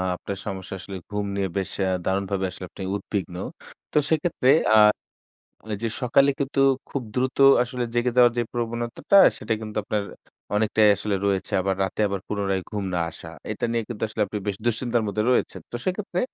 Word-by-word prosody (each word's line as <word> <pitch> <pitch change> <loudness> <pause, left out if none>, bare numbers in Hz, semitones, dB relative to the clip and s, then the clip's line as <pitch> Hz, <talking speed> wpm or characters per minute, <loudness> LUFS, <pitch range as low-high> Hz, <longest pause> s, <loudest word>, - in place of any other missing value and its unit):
আপনার 100 +2 -6
সমস্যা 95 -1 -5
আসলে 95 +2 -7
ঘুম 105 0 -1
নিয়ে 100 -1 0
বেশ 95 - -2
অ্যা 95 - +1
দারুণভাবে 95 0 0
আসলে 95 0 -7
আপনি 95 - -8
উদ্বিগ্ন। 100 -3 -4 0.6
তো - - +2
সেক্ষেত্রে 155 -4 +1 0.3
আ - - +7 1.0
এইযে 115 +3 -2
সকালে 135 +3 +4
কিন্তু 140 0 -1 0.3
খুব 140 - -3
দ্রুত 130 +1 0 0.3
আসলে 125 0 -4
জেগে 120 +1 +1
দেওয়ার 120 -1 +7
যে 120 - +2
প্রবণতাটা, 120 +8 0 0.2
সেটা 115 - -2
কিন্তু 110 0 -6
আপনার 105 0 -1 0.5
অনেকটাই 110 0 +4
আসলে 105 0 -2
রয়েছে। 95 -1 0
আবার 95 +1 0
রাতে 95 - -4
আবার 100 -1 -3
পুনরায় 100 -2 -1
ঘুম 105 -3 -3
না - - 0
আসা। 80 - -10 0.2
এটা - - -2
নিয়ে 115 -1 0
কিন্তু 115 -3 -5
আসলে 110 - -4
আপনি 105 +2 -5
বেশ 100 - 0
দুঃশ্চিন্তার 120 0 +1
মধ্যে 105 +1 -1
রয়েছেন। - - 0
তো - - -4
সেক্ষেত্রে 185 -1 -2
105 Hz, 175 wpm, -24 LUFS, 100-120 Hz, 1.0 s, আ